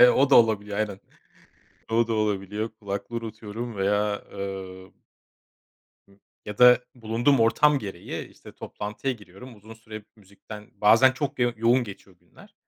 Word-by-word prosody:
E, 125 - +9
o 140 - +3
da - - +6
olabiliyor 105 -3 +2
aynen. 100 -2 -3 0.9
O 115 0 +2
da 115 - -1
olabiliyor, 105 0 -2
kulaklığı 100 +3 -5
unutuyorum 115 0 -6
veya 105 +1 0
eee 95 -1 -7 1.2
ı 100 0 -24 0.3
ya 105 0 -8
da 125 0 +8 0.2
bulunduğum 120 +3 +1
ortam 140 +6 +4
gereği, 95 -6 -7
işte, - - -15
toplantıya 105 +6 -5
giriyorum. 110 +2 -13
Uzun 110 +2 -13
süre 110 -2 -11
müzikten 105 +1 -13
bazen 115 +6 +5
çok 140 0 -4
yo 120 -1 +2
yoğun 120 +3 +2
geçiyor 95 -3 -12
günler. - - -20
110 Hz, 140 wpm, -25 LUFS, 100-120 Hz, 1.2 s, E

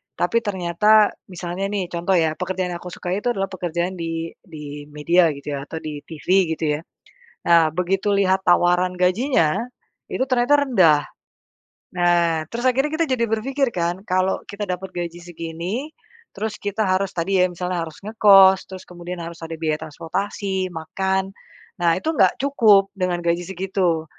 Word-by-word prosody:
tapi 230 +6 +1
ternyata, 205 +2 +3 0.2
misalnya, 180 +2 -4
nih, 195 -4 -2
contoh, 175 +2 0
ya, 160 -2 +2
pekerjaan 185 0 -2
yang 170 - -5
aku 180 - -9
sukai 180 +3 -3
itu 245 - 0
adalah 195 0 -2
pekerjaan 175 0 -2
di 165 0 -3
di 150 -3 -9
media, 165 +4 +3
gitu, 140 +1 -5
ya, 140 - -7
atau - - -8
di 150 -2 -5
TV, 160 -2 -11 0.3
gitu, 160 - -3
ya. - - -11 0.7
Nah, 165 -2 +6
begitu 190 +3 0
lihat 190 -1 +3
tawaran 180 +1 +3
gajinya, 180 - +2 0.5
itu 260 - -1
ternyata 255 +3 +3
rendah. 175 - +4 1.0
Nah, 170 -2 +2
terus 235 +2 -4
akhirnya 270 +4 +1
kita 330 0 +1
jadi 235 -2 0
berpikir, 265 +4 0
kan, 175 +2 -1
kalau 185 +1 +1
kita 205 +1 -4
dapat 185 +1 -4
gaji 175 0 -5
segini, 175 - -5 0.4
terus 215 +1 -3
kita 205 +2 -2
harus 185 +1 +1
tadi, 190 +3 0
ya, 180 - +5
misalnya 180 -1 -3
harus 160 - -11
ngekos, 195 -3 +6
terus 185 -1 -8
kemudian 175 0 -7
harus 170 0 -8
ada 165 - -6
biaya 155 -1 0
transportasi, 190 +4 -3
makan, 190 +4 -2 0.5
nah 170 -1 +3
itu 250 - -4
nggak - - +4
cukup 220 -8 +4
dengan 180 -2 -1
gaji 170 0 0
segitu. 185 -3 -1
180 Hz, 160 wpm, -22 LUFS, 170-195 Hz, 1.0 s, Nah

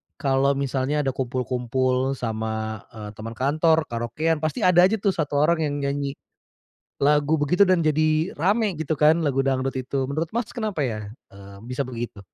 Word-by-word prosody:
kalau 140 0 +1
misalnya 140 +2 -1
ada 135 - 0
kumpul-kumpul 130 +1 -1
sama, 110 -2 -4
eee, 105 -3 -9
teman 115 +1 -6
kantor, 155 +5 +2
karaokean, 150 +8 -1
pasti 155 -1 -2
ada 180 0 +6
aja 215 - 0
tuh 200 -2 +1
1 155 -5 -2
orang 170 +1 +2
yang 150 -2 -1
nyanyi 140 0 -2 0.8
lagu 150 +2 +3
begitu, 180 +7 +4
dan 185 -2 +3
jadi 155 +1 +1
rame 200 +4 +1
gitu 155 -1 -3
kan, 155 +2 +4
lagu 140 -3 0
dangdut 135 -1 0
itu. 135 +1 -2
Menurut 150 +5 -2
Mas, 235 -1 -2
kenapa 215 - -2
ya, 115 -5 -2 0.3
eee, 100 0 -13
bisa 125 +2 -3
begitu? 120 -4 -6
140 Hz, 165 wpm, -24 LUFS, 130-160 Hz, 0.8 s, ada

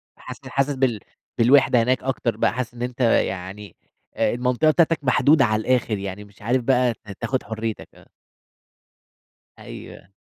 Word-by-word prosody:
حاسس - - -11
حاسس 140 +1 -1
بال 130 -5 0 0.4
بالوحدة 125 0 +4
هناك 125 +1 0
أكتر 125 -4 -2
بقى، 115 - +1
حاسس 125 -1 -4
إن 120 - -11
أنت 125 +1 -5
يعني 100 -3 -1 0.4
المنطقة 125 +5 +1
بتاعتك 165 0 +2
محدودة 135 +3 +4
على 110 -1 0
الآخر، 120 -2 0
يعني 100 +1 -6
مش 100 -1 -20
عارف 120 +4 0
بقى 125 -1 +2
ت - - -27 0.2
تاخد 130 -1 -2
حريتك، 110 -1 -5
آه. - - -19 1.5
أيوه. - - -11
125 Hz, 145 wpm, -22 LUFS, 110-130 Hz, 1.5 s, بالوحدة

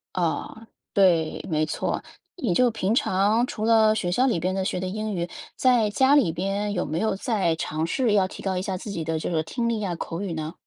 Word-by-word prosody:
哦， 185 +6 -2 0.3
对， 175 -6 +3
没 155 -1 +1
错， - - -2 0.3
你 245 - -1
就 250 +6 +4
平 215 -2 -1
常 215 +2 +2
除 215 -2 -4
了 220 -1 +5
学 175 -5 -1
校 255 +8 +3
里 200 -9 +1
边 185 +2 -1
的 190 - -1
学 185 - -2
的 185 - -3
英 215 +2 -3
语， 170 0 -2 0.3
在 245 -5 +3
家 265 +6 +3
里 245 - +4
边 195 +4 -2
有 180 - -1
没 155 +3 -2
有 220 -3 0
再 195 -7 0
尝 160 0 -2
试 240 +2 +1
要 195 -2 +3
提 - - -10
高 190 -1 -1
一 180 - -1
下 190 -1 -3
自 210 +2 -7
己 170 -5 -3
的 160 0 -1
这 160 - -3
个 160 - +1
听 235 +9 -3
力 230 -2 0
呀、 185 -5 -2
口 165 +2 -5
语 190 -5 -3
呢？ 155 +1 -4
195 Hz, 255 characters per minute, -25 LUFS, 170-220 Hz, 0.3 s, 了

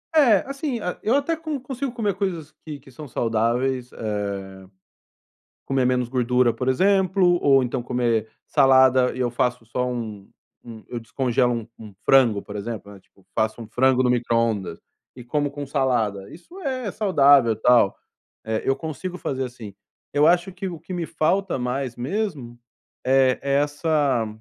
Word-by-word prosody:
É, 240 -11 +5
assim, 275 -3 -3 0.2
eu 225 +5 +2
até 285 +4 +1
con 315 -3 -4
consigo 265 +1 -4
comer 215 -5 -1
coisas 175 -6 -3
que 150 -3 -7
que - - -18
são 150 +4 -10
saudáveis, 120 +2 -1
eh, 105 -2 -3 1.5
comer 135 -2 +1
menos 125 -1 +1
gordura, 125 -1 +2
por 125 +3 -2
exemplo, 185 +3 +3
ou 135 -1 +5
então 125 0 -2
comer 120 -3 0 0.2
salada. 130 -1 +4
E - - -7
eu 125 -1 +1
faço 125 -1 -1
só 125 +2 -2
um 110 -5 -6 0.3
um 115 -2 -11
eu 120 - -5
descongelo 125 +1 0
um 115 -2 -4
um 105 -2 -11
frango, 120 -7 +4
por 105 - -10
exemplo, 105 0 -6
né, 100 - -13
tipo, 95 0 -29
faço 110 +2 -1
um 115 - -8
frango 130 +3 +2
no 125 - +2
microondas 115 -4 0 0.4
e 125 - -10
como 145 +4 -1
com 145 0 -6
salada. 120 -8 -1
Isso 175 - -14
é 255 - -3
saudável 140 - +4
e - - 0
tal, 120 -5 +4 0.5
eh, 110 0 -2
eu 135 - +2
consigo 160 +5 -6
fazer 135 -6 -3
assim. 120 -5 -9 0.4
Eu 145 +1 +4
acho 175 +2 +3
que 185 +2 -6
o 170 -3 -8
que 170 - -9
me 175 -2 -3
falta 190 +5 0
mais 125 0 -3
mesmo, 135 - -4 0.5
eh, 130 0 +3
é 140 0 -1
essa 145 -5 0
130 Hz, 165 wpm, -23 LUFS, 120-170 Hz, 1.5 s, É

